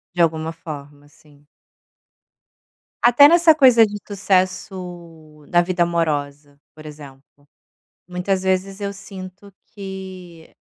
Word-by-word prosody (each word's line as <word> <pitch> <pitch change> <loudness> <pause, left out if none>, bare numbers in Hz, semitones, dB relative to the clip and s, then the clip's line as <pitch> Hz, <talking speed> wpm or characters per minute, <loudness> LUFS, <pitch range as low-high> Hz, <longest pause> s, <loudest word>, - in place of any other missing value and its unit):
De 175 - +1
alguma 160 -1 0
forma 145 -3 -10
sim. 145 -1 -24 1.6
Até 245 +4 +8
nessa 335 0 +6
coisa 255 -6 +6
de 205 -1 -6
sucesso 180 -5 -3
na 175 - +4
vida 175 0 0
amorosa, 145 -4 -3 0.2
por 155 0 -14
exemplo. 145 -1 -14 0.6
Muitas 180 +1 -2
vezes 190 +1 -1
eu 200 -1 -3
sinto 195 0 -11
que 190 -4 -10
180 Hz, 105 wpm, -20 LUFS, 155-195 Hz, 1.6 s, Até